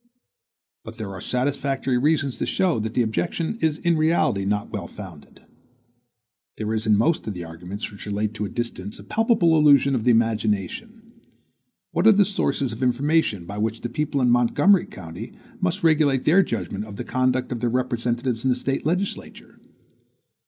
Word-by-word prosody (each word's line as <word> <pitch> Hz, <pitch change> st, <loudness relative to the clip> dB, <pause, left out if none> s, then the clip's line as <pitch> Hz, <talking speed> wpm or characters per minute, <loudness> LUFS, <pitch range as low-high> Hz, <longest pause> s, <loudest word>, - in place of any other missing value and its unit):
But 110 Hz, +1 st, -10 dB
there 105 Hz, -4 st, -5 dB
are 95 Hz, -2 st, -8 dB
satisfactory 135 Hz, 0 st, -1 dB
reasons 145 Hz, -1 st, +1 dB
to -, -, -1 dB
show 180 Hz, -10 st, +1 dB
that 110 Hz, +1 st, -4 dB
the 125 Hz, -, +3 dB
objection 165 Hz, -, -2 dB
is 155 Hz, -2 st, +1 dB
in 170 Hz, 0 st, +1 dB
reality 155 Hz, -, +1 dB
not 105 Hz, +1 st, -1 dB
well -, -, -4 dB
founded. -, -, -12 dB, 1.1 s
There 110 Hz, 0 st, -2 dB
is 110 Hz, 0 st, -2 dB
in 105 Hz, -1 st, +5 dB
most 150 Hz, +2 st, +1 dB
of 105 Hz, -, -3 dB
the 90 Hz, -, -5 dB
arguments 90 Hz, +6 st, -7 dB
which 100 Hz, -, -10 dB
relate 105 Hz, +1 st, -2 dB
to 105 Hz, -1 st, -3 dB
distance 105 Hz, -3 st, -5 dB
a -, -, -11 dB
palpable 215 Hz, -7 st, +2 dB
illusion 140 Hz, -2 st, +5 dB
of 120 Hz, -4 st, 0 dB
the 125 Hz, -, +2 dB
imagination. 115 Hz, -, 0 dB, 0.9 s
What -, -, +2 dB
are -, -, +9 dB
the 200 Hz, 0 st, +4 dB
sources 145 Hz, -, -1 dB
of 110 Hz, -, -8 dB
information 130 Hz, -, +1 dB
by 100 Hz, +4 st, -6 dB
which 110 Hz, +1 st, -2 dB
the 120 Hz, -, -4 dB
people 140 Hz, +1 st, -1 dB
in 125 Hz, -1 st, +3 dB
Montgomery 120 Hz, +11 st, +4 dB
County 95 Hz, +6 st, -9 dB, 0.3 s
must 185 Hz, +2 st, -1 dB
regulate 150 Hz, -5 st, +3 dB
their 175 Hz, +6 st, +5 dB
judgment 100 Hz, -, -3 dB
of 100 Hz, -2 st, -10 dB
the -, -, -4 dB
conduct 130 Hz, 0 st, 0 dB
of 120 Hz, -, -3 dB
their 120 Hz, +1 st, 0 dB
representatives 120 Hz, -1 st, -1 dB
in 130 Hz, -, +1 dB
the 125 Hz, -, +3 dB
State 135 Hz, +2 st, -2 dB
legislature? 185 Hz, +4 st, -4 dB
125 Hz, 175 wpm, -23 LUFS, 110-155 Hz, 1.1 s, are